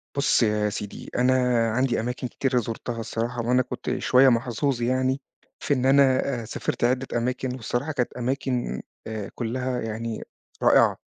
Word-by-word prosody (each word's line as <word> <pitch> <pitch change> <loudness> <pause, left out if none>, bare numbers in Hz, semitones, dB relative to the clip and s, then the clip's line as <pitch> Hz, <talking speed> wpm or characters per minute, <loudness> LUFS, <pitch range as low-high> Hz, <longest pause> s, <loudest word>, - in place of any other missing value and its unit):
بُص 140 -3 +3
يا 105 -1 +1
سيدي، 105 -1 -6
أنا 125 +1 +4 0.4
عندي 130 0 +1
أماكن 125 +2 -3
كتيرة 130 0 -1
زُرتها 115 +1 -4
الصراحة، 115 +2 -3
وأنا 125 +1 +4
كنت 125 - -3
شوية 130 +1 +5
محظوظ 120 +2 0
يعني، 130 +2 +1 0.4
في 145 - 0
إن 130 -1 0
أنا 140 +1 +6 0.4
آآ - - -8
سافِرت 115 - -3
عِدة 130 +2 +2
أماكن، 125 +1 -2
والصراحة، 130 +5 -2
كانت 125 -4 -1
أماكن 125 - -2 0.3
آآ، 110 -2 -5
كلّها 125 +1 -2
يعني 115 0 -4 0.4
رائعة. - - +5
125 Hz, 150 wpm, -25 LUFS, 115-130 Hz, 0.4 s, أنا